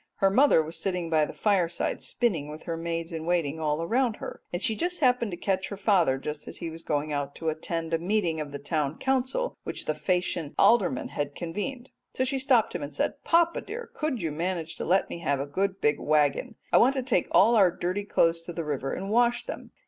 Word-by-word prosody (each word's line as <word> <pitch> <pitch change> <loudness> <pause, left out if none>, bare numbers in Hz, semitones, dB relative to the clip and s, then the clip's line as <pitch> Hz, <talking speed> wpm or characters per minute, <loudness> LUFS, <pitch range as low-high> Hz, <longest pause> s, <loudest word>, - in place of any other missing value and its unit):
Her 195 -1 +3
mother 255 - +5
was 160 +2 -6
sitting 180 -4 -2
by 155 -1 +4
the - - -7
fireside 180 -5 0
spinning 170 - -1
with 155 +1 -9
her 165 - -3
maids 165 0 -3
in 160 -1 -4
waiting 160 -3 0
all 155 +1 0
around 235 +4 +1
her, - - -8
and 175 - -2
she 220 +3 0 0.2
happened 250 -5 +3
to 175 - -5
catch 190 0 0
her 200 - -6
father 185 -9 +3
just 150 +2 -6
as - - -7
he 170 -2 -5
was 165 +1 -9
going 150 0 -1
out 145 -1 -3
to 160 - -2
attend 165 +1 -3
a 165 - +2
meeting 175 -3 0
of 145 -1 -6
the 140 - -4
Town 150 0 -2
Council 265 - 0
which - - -5
the 155 - 0
Phaeacian 175 -1 -1
aldermen 195 - +3
had 145 -1 -3
convened. 225 +10 -5 0.2
So 260 - 0
she 265 +1 0
stopped 255 -4 +3
him - - -3
and - - -6
said, - - -2
'Papa, 335 0 +3
dear, 465 +3 -7
could 295 - -2
you 160 - -1
manage 165 0 -3
to - - -4
let 190 +3 +3
me - - -6
have 140 -5 0
a 140 - -2
good 190 +6 -1
big 150 0 +2
waggon? 155 - +1 0.2
I - - +7
want 260 +3 +4
to 265 - -1
take 235 -9 +1
all 225 +5 +5
our 195 -5 +6
dirty 180 +3 -2
clothes 165 -4 +2
to 170 +1 -8
the 165 -1 -4
river 135 -2 -2
and 195 +1 -5
wash 240 +1 +3
them. - - -7
175 Hz, 230 wpm, -27 LUFS, 155-225 Hz, 0.2 s, I